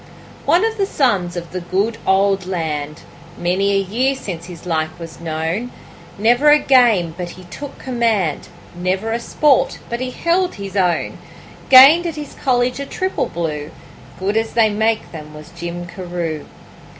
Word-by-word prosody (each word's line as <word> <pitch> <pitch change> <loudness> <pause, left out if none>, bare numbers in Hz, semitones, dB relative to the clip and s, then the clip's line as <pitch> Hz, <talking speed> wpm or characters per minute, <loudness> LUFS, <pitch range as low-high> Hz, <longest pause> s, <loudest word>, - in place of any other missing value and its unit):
One 355 +5 +4
of 450 0 -2
the 395 - +2
sons 195 - 0
of 170 -1 -6
the 185 - -3
good 195 +6 -1
old 195 -1 +2
land 150 -4 -3 0.4
Many 185 +3 +1
a - - +3
year 235 +8 0
since 175 -10 -6
his 175 -2 -11
like 160 -1 -2
was 165 -1 -9
known; 165 +8 -3 0.5
Never 240 +8 +4
a 295 - +8
game 235 - +3
but 175 -1 -5
he 185 +1 -11
took 275 +11 -9
command, 225 - -1 0.3
Never 185 +5 -2
a 230 - -1
sport 275 +3 +2
but 235 - -2
he 255 0 -3
held 350 +7 0
his 200 -1 -7
own; 180 -3 0 0.5
Gained 280 +7 +9
at 330 - -4
his 295 -2 -7
college 250 0 +1
a 280 - -3
triple 375 0 -2
blue 155 -3 -4 0.5
Good 200 +3 -1
as 225 0 -1
they 220 -2 +4
make 220 +1 0
them 150 -2 -9
was 150 +2 -11
Jim 175 0 -5
Carew. 175 -4 -5
195 Hz, 165 wpm, -19 LUFS, 175-245 Hz, 0.5 s, Gained